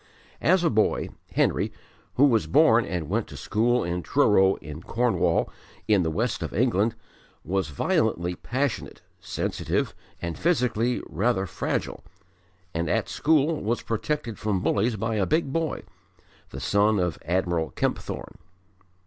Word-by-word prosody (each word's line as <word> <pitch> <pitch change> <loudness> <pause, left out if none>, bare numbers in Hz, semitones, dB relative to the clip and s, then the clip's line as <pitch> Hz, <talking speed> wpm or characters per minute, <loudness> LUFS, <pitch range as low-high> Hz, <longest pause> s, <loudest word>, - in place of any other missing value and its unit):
As 180 +2 +4
a 165 - +3
boy 110 -1 +1 0.2
Henry, - - +1 0.4
who 140 - +6
was 115 -6 +3
born 135 -6 +5
and 85 -4 -3
went 105 +6 -1
to - - -10
school 120 +3 +1
in 85 +1 -2
Truro, 95 -6 +4
in 75 +2 -9
Cornwall, 115 -2 +1 0.4
in 105 -3 +4
the 80 - 0
West 110 +8 -1
of - - -4
England, 115 -1 +2 0.5
was 95 0 0
violently 85 +4 0
passionate, 130 +7 -3 0.2
sensitive, - - -2 0.3
and 85 -1 -5
physically 125 -7 +1
rather 105 -2 0
fragile, 85 - -3 0.7
and 85 0 -1
at - - 0
school 155 0 +2
was 115 +3 -1
protected 115 0 -3
from 105 -3 0
bullies 110 +3 +1
by 110 +2 -2
a 95 - +1
big 155 -3 +1
boy, 165 -2 -1 0.7
the - - -7
son 105 +1 +2
of 90 -3 -1
Admiral 85 -2 0
Kempthorne. - - -3
110 Hz, 140 wpm, -26 LUFS, 95-125 Hz, 0.7 s, who